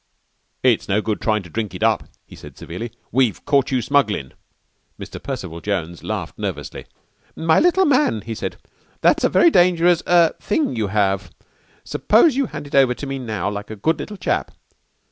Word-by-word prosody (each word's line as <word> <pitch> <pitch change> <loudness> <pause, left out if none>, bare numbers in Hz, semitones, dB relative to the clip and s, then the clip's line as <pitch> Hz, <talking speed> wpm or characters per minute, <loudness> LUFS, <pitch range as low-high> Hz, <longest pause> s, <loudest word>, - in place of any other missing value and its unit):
"It's 125 -6 +2
no 100 +2 +2
good 110 -1 -2
tryin' 110 -2 0
to 90 - -13
drink 110 0 -3
it - - -4
up," - - +2 0.2
he - - -14
said - - -13
severely. 110 +8 -7 0.2
"We've 120 -8 +1
caught 140 -2 +2
you 130 -3 0
smugglin'." 105 - 0 0.7
Mr. - - -8
Percival 85 +1 -6
Jones 85 -4 -3
laughed - - -5
nervously. - - -5 0.5
"My 160 0 +3
little 355 +2 +4
man!" 265 - +2
he 115 - -6
said, 110 - -5 0.5
"that's - - +3
a - - +4
very 340 - +5
dangerous 175 - +4
er 170 -2 +5
thing 310 - 0
for - - -5
you 110 -3 -1
to 95 - -6
have! 100 -2 +1 0.5
Suppose 315 -7 +3
you 275 -2 +1
hand 150 -4 -7
it 140 - -13
over 130 -3 +4
to 145 - -7
me, 135 0 -4
now, 110 -8 -3
like 105 0 -6
a 110 - -6
good 160 +11 0
little 210 - -6
chap." - - -1
125 Hz, 190 wpm, -21 LUFS, 105-165 Hz, 0.7 s, very